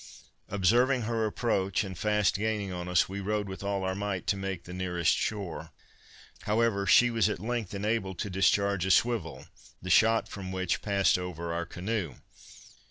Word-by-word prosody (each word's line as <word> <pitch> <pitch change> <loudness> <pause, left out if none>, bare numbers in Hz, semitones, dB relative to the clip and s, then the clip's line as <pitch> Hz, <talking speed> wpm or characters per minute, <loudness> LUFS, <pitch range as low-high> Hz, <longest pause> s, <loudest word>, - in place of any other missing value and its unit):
Observing 120 +7 +3
her 115 0 0
approach, 100 -3 0
and 95 -2 -6
fast 105 +2 +1
gaining 105 -2 -2
on 90 0 -5
us, 90 -1 +3
we 100 +1 -5
rowed 105 +1 -2
with 95 +1 -7
all 100 -1 -1
our 95 0 -1
might 100 -1 -3
to - - +1
make 95 -3 -4
the 90 - -9
nearest 90 -2 +1
shore. 85 -7 -3 0.8
However, 105 -2 +1
she 120 +4 +6
was 115 -2 +2
at 105 - -2
length 110 -1 -3
enabled 100 -2 -2
to 100 - -3
discharge 100 0 +2
a - - -1
swivel, 95 - +1 0.3
the 90 - -4
shot 115 0 +4
from 95 -2 -7
which 95 -1 -1
passed 100 -3 +2
over 85 -2 -5
our 85 0 -3
canoe. 90 - -3
100 Hz, 170 wpm, -29 LUFS, 90-105 Hz, 0.8 s, she